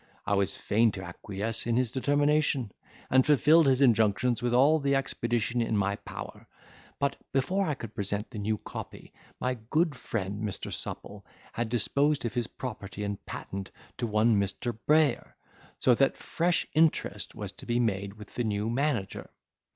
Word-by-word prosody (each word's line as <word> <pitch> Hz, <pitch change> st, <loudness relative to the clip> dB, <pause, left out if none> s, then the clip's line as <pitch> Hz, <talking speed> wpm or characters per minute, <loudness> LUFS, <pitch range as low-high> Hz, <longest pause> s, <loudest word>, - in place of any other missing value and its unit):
I 100 Hz, -, 0 dB
was 100 Hz, -1 st, +1 dB
fain 110 Hz, +2 st, +2 dB
to 95 Hz, -, -6 dB
acquiesce 100 Hz, +5 st, -3 dB
in 115 Hz, 0 st, +2 dB
his 125 Hz, -3 st, +1 dB
determination, 145 Hz, -3 st, +1 dB, 0.4 s
and 130 Hz, 0 st, +6 dB
fulfilled 150 Hz, +2 st, +5 dB
his 130 Hz, 0 st, +3 dB
injunctions 115 Hz, -1 st, +3 dB
with 120 Hz, 0 st, 0 dB
all 140 Hz, +6 st, +5 dB
the 140 Hz, -1 st, +1 dB
expedition 120 Hz, -3 st, 0 dB
in 115 Hz, -2 st, 0 dB
my 100 Hz, 0 st, +1 dB
power; -, -, -9 dB, 0.5 s
but, 140 Hz, -, 0 dB
before 185 Hz, +9 st, +1 dB
I 150 Hz, -, 0 dB
could 115 Hz, -3 st, -8 dB
present 105 Hz, -1 st, -3 dB
the 105 Hz, -, -6 dB
new 105 Hz, +1 st, 0 dB
copy, -, -, -9 dB, 0.3 s
my 125 Hz, -1 st, -1 dB
good 160 Hz, 0 st, +2 dB
friend 105 Hz, -4 st, -4 dB
Mr. 105 Hz, -3 st, -4 dB
Supple -, -, -5 dB, 0.3 s
had 115 Hz, -1 st, -2 dB
disposed 140 Hz, +4 st, +1 dB
of 115 Hz, -, -2 dB
his 120 Hz, -2 st, -1 dB
property 105 Hz, -5 st, -6 dB
and 100 Hz, -1 st, -4 dB
patent 95 Hz, 0 st, -6 dB, 0.3 s
to 120 Hz, -, -1 dB
one 110 Hz, 0 st, +3 dB
Mr. 100 Hz, +4 st, -2 dB
Brayer; 150 Hz, -4 st, +3 dB, 0.4 s
so 125 Hz, -, +4 dB
that 135 Hz, +3 st, +2 dB
fresh 170 Hz, +1 st, 0 dB
interest 160 Hz, +1 st, +1 dB
was -, -, -5 dB
to -, -, -10 dB
be 120 Hz, 0 st, +1 dB
made 100 Hz, -3 st, -1 dB
with 105 Hz, -2 st, -12 dB
the 120 Hz, -, -1 dB
new 105 Hz, 0 st, -1 dB
manager. 125 Hz, -6 st, -1 dB
120 Hz, 165 wpm, -29 LUFS, 105-140 Hz, 0.5 s, and